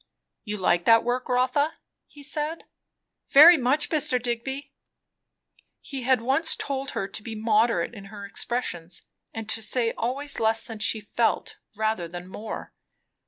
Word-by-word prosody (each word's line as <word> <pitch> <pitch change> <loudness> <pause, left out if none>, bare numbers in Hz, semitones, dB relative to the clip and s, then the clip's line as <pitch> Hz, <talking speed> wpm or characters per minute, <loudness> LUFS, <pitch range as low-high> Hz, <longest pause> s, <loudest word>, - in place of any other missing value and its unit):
"You 210 -2 -4
like 175 -2 +1
that 225 0 +6
work, 250 +2 -2
Rotha," 255 +5 +1 0.3
he 290 - -14
said. 300 +3 -2 0.7
"Very 315 +5 +10
much, 270 +1 +1
Mr. 275 -5 +2
Digby!" 245 +4 -4 1.1
He 275 -2 -7
had 255 -1 +2
once 270 +7 +2
told 275 -1 -4
her 195 - -1
to 205 - -6
be 220 +1 -7
moderate 220 -3 +1
in 200 -3 -10
her 200 -1 -9
expressions, 185 -5 -4 0.3
and 225 -2 -6
to 225 - -1
say 230 +1 0
always 275 +5 -2
less 225 0 +2
than 225 -3 -8
she 215 +1 +1
felt, 225 +3 -1 0.2
rather 215 -5 -1
than 175 +1 -8
more. 210 +4 -7
235 Hz, 150 wpm, -26 LUFS, 215-265 Hz, 1.1 s, Very